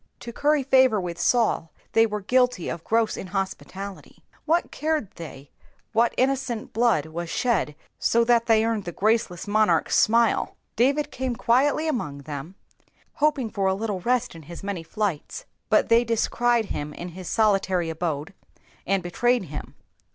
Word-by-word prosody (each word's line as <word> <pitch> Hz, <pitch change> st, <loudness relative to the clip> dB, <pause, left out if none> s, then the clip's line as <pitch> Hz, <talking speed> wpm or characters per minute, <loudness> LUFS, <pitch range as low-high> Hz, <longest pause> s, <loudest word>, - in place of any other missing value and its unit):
To 235 Hz, -, -7 dB
curry 295 Hz, +2 st, +2 dB
favour 260 Hz, -4 st, +4 dB
with 175 Hz, -2 st, -5 dB
Saul 225 Hz, -7 st, +1 dB, 0.2 s
they 225 Hz, 0 st, +4 dB
were 210 Hz, -1 st, -4 dB
guilty 250 Hz, -3 st, +1 dB
of 165 Hz, -, -5 dB
gross 225 Hz, -1 st, +1 dB
inhospUalUy. 195 Hz, +1 st, -5 dB, 0.3 s
Whai 335 Hz, +3 st, +4 dB
cared 310 Hz, -8 st, -1 dB
they 145 Hz, -4 st, -10 dB, 0.4 s
whai 230 Hz, +2 st, +4 dB
innocent 255 Hz, -3 st, -1 dB
blood 225 Hz, -9 st, +2 dB
was 165 Hz, +2 st, -6 dB
shed 195 Hz, -12 st, 0 dB, 0.2 s
so 235 Hz, 0 st, +3 dB
thai 240 Hz, 0 st, +5 dB
they 220 Hz, -1 st, +4 dB
earned 225 Hz, -4 st, -1 dB
Hie 175 Hz, -, -4 dB
graceless 210 Hz, -3 st, 0 dB
monarch's 215 Hz, +1 st, +2 dB
smile! 230 Hz, +1 st, +3 dB, 0.2 s
David 275 Hz, +6 st, +2 dB
came 255 Hz, -1 st, -3 dB
quietly 270 Hz, +6 st, +2 dB
among 150 Hz, -, -3 dB
them, 150 Hz, +5 st, -7 dB, 0.7 s
hoping 285 Hz, -7 st, +2 dB
for 195 Hz, -2 st, 0 dB
a 190 Hz, -, +2 dB
little 205 Hz, -2 st, -3 dB
rest 250 Hz, +5 st, 0 dB
in 165 Hz, -, -11 dB
his 170 Hz, -, -9 dB
many 195 Hz, -3 st, -3 dB
flights, 200 Hz, -, -3 dB, 0.2 s
but -, -, +3 dB
they 230 Hz, +1 st, +5 dB
descried 235 Hz, 0 st, +1 dB
him 145 Hz, 0 st, -4 dB
in 175 Hz, 0 st, -7 dB
Ms 185 Hz, 0 st, -7 dB
solilary 195 Hz, -6 st, +2 dB
abode, 160 Hz, 0 st, -3 dB, 0.5 s
and 195 Hz, -1 st, +1 dB
betrayed 240 Hz, +6 st, +1 dB
him. 150 Hz, -, -7 dB
215 Hz, 155 wpm, -25 LUFS, 175-240 Hz, 0.7 s, thai